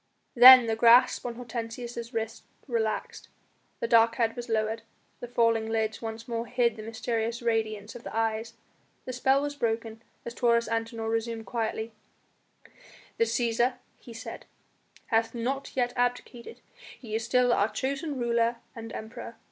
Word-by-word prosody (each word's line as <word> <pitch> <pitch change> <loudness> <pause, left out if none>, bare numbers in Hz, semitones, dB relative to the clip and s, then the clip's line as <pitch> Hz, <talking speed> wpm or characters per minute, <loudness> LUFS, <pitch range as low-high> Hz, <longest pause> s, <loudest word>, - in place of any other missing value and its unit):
Then 255 0 +10
the 225 -1 0
grasp 235 +2 +5
on 235 - -5
Hortensius' 235 0 -6
wrist 225 -1 -4 0.2
relaxed, 225 -4 -3 0.5
the 235 - -2
dark 230 -1 +5
head 225 -2 0
was 240 0 -7
lowered, 220 0 0 0.4
the 245 - -7
falling 230 -2 +1
lids 220 -1 -1
once 225 0 -6
more 230 0 -3
hid 235 -2 +1
the 220 - -8
mysterious 225 +1 -3
radiance 220 -2 -1
of 240 - -10
the - - -6
eyes. 225 0 -1 0.5
The 255 - -5
spell 265 +3 +2
was 290 0 -3
broken 225 -3 -2 0.2
as 235 - -5
Taurus 235 -1 +2
Antinor 225 0 -3
resumed 225 0 -2
quietly: 225 -1 -3 1.3
"The 230 - +4
Cæsar," 235 +2 +1 0.2
he 240 - -13
said, 230 - -9 0.7
"hath 225 +1 +2
not 265 +4 -3
yet 245 -1 +1
abdicated; 245 - -3 0.4
he 225 -4 -9
is 225 +1 -1
still 245 +1 +3
our 205 -1 +2
chosen 275 +5 -3
ruler 235 -1 +1 0.2
and 225 -1 -8
Emperor. 220 +2 -8
230 Hz, 150 wpm, -28 LUFS, 225-245 Hz, 1.3 s, Then